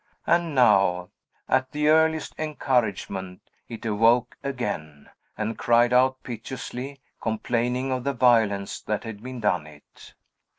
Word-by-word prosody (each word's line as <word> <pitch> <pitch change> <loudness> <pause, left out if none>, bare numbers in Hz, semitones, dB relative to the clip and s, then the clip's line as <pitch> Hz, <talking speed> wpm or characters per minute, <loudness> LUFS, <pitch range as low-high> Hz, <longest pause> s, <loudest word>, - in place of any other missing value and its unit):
And 170 -3 +1
now, 100 -6 +3 0.4
at 130 0 +1
the 150 0 +1
earliest 160 0 +3
encouragement, 110 -11 -1 0.3
it 115 0 -8
awoke 115 +3 +3
again, 80 - -5 0.3
and 110 +1 -3
cried 120 +1 +3
out 130 +1 +3
piteously, 125 +3 -6 0.2
complaining 120 +3 -1
of 130 -1 -2
the 140 +1 -1
violence 110 -6 +2
that 105 -1 -3
had 110 -3 -8
been 130 +1 -7
done 90 -7 0
it. 75 -1 -16
120 Hz, 125 wpm, -25 LUFS, 105-130 Hz, 0.4 s, now